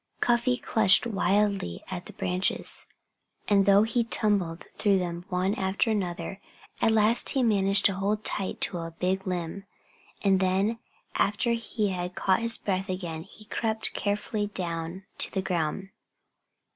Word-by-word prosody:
Cuffy 240 +1 +2
clutched 215 -4 +4
wildly 200 - 0
at 180 -1 -5
the - - -11
branches. 180 +1 -1 0.6
And 200 -2 +3
though 200 +1 +6
he 230 +2 +1
tumbled 200 -7 0
through 200 -2 +3
them 175 -1 -3
one 185 +2 0
after 195 +2 0
another, 195 -1 -3 0.4
at - - +4
last 220 +2 +4
he 265 - +1
managed 200 -3 +3
to 200 - +5
hold 205 +3 -1
tight 195 -2 -2
to 175 - +1
a 165 0 -5
big 190 +1 -1
limb. 180 +2 -3 0.6
And 195 -2 +4
then, 195 +4 +1 0.4
after 210 +4 +1
he 225 -2 -1
had 180 -1 -4
caught 190 -1 +2
his 230 -1 +1
breath 195 -1 -2
again, 175 -4 -4
he 205 +4 -14
crept 220 0 -1
carefully 205 +1 -1
down 170 -1 -4 0.2
to - - +5
the 190 - -2
ground. 180 +1 -2
195 Hz, 150 wpm, -27 LUFS, 185-215 Hz, 0.6 s, though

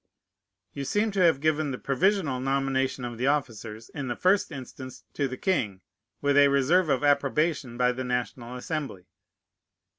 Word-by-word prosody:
You 140 - -4
seem 210 +9 0
to 195 - -2
have 165 -6 +4
given 155 0 +1
the 130 - -3
provisional 155 -1 +1
nomination 135 -1 0
of 120 -1 -6
the 130 - +1
officers, 115 -6 -2
in 140 -2 -5
the 120 - -2
first 190 0 +2
instance, 130 -2 -9
to 140 - 0
the 130 0 -6
king, 110 - -1 0.4
with 145 0 +2
a 145 0 +7
reserve 145 +6 +3
of 135 0 +1
approbation 140 -2 +1
by 125 0 +3
the 130 +1 -4
National 125 0 -3
Assembly. 135 - -5
135 Hz, 160 wpm, -27 LUFS, 125-150 Hz, 0.4 s, a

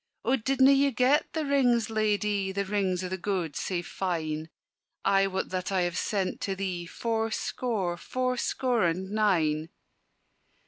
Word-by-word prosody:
"O 265 - +3
didna 265 +2 +4
ye 275 0 +4
get 260 +3 +2
the 315 -2 -1
rings, 245 -5 +2
Ladye, 210 -2 +1
The 200 +1 -2
rings 190 -2 0
o' - - -2
the 190 +1 -4
gowd 175 -6 -2
sae 175 -2 -2
fine? 160 -4 -3 0.6
I 195 0 +4
wot 190 0 -3
that 185 +1 -3
I 190 -2 +2
have 175 -1 -1
sent 195 -1 -1
to 195 - -1
thee 185 -3 -3
Four 225 +4 -1
score, 215 -6 -2
four 255 +7 -1
score 245 -1 0
and 185 +3 -1
nine." 165 -7 +1
195 Hz, 155 wpm, -28 LUFS, 180-235 Hz, 0.6 s, didna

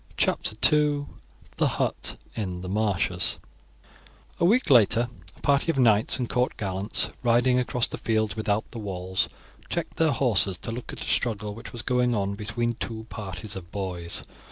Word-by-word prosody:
CHAPTER 110 - +1 0.2
II: 145 -1 +2 0.5
THE - - +3
HUT - - -1 0.2
IN 95 -5 -3
THE 90 - -6
MARSHES 100 -2 0 1.0
A - - +3
week 220 - +3
later 120 0 +5 0.3
a - - -19
party 140 +3 +2
of 165 - +1
knights 110 -4 +4
and 125 -3 -2
court 125 +1 0
gallants, 95 +1 -1
riding 125 +1 +3
across 125 -1 +2
the - - -6
fields 110 -2 0
without 110 -1 0
the 115 - -6
walls, 95 -3 -2 0.4
checked - - -3
their 160 -1 +4
horses 110 -9 +3
to - - -2
look 120 +2 -6
at - - -8
a - - -8
struggle 105 -3 0
which 115 - -9
was 120 -1 -7
going 125 -1 +2
on 100 -1 0
between 115 +3 -2
two 110 -1 -5
parties 100 -1 -6
of 90 -3 -8
boys. 90 -4 -3
110 Hz, 170 wpm, -26 LUFS, 100-125 Hz, 1.0 s, later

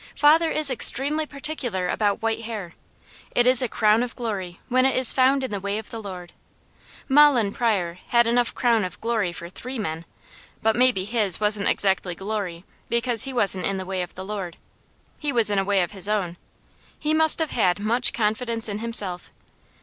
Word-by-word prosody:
Father 320 +3 +4
is 305 -3 +3
extremely 290 +5 +4
particular 275 -11 -3
about 205 +3 -1
white 225 0 -1
hair. 205 -7 -7 0.6
It 240 - +3
is 255 0 +6
a 250 - 0
"crown 215 0 +2
of 245 0 -4
glory," 195 -7 -5
when 255 0 +1
it 265 - +1
is 255 -2 +4
found 265 +1 +2
in 260 - -4
the 200 - -3
way 200 +2 -3
of 220 - -9
the 225 - -6
Lord. 180 -4 -9 0.7
Mahlon 270 -7 +4
Pryor 185 -7 -2
had 235 0 +3
enough 240 +1 0
crown 235 -3 +1
of 185 - -7
glory 220 -6 -1
for 170 0 -8
three 250 +8 -8
men, 165 -6 -5 0.6
but 220 0 +2
maybe 245 -6 +2
his 210 -5 +5
wasn't 210 -1 0
exactly 190 -2 0
glory, 195 -3 -5 0.2
because 235 -1 +1
he 270 - -5
wasn't 200 -7 +1
in 195 - -2
the 190 - -6
way 190 0 -3
of 180 - -8
the 185 - -8
Lord. 195 -4 -6 0.6
He 295 -2 -3
was 230 -5 +2
in 200 - +1
a - - 0
way 195 -1 +1
of 175 - -6
his 200 0 -2
own. 190 -5 -2 0.6
He 305 0 -2
must 315 0 +3
have 320 -2 -2
had 180 -6 +1
much 225 +5 +2
confidence 230 +1 -2
in 205 -1 -5
himself. 205 -6 -2
220 Hz, 195 wpm, -23 LUFS, 195-250 Hz, 0.7 s, is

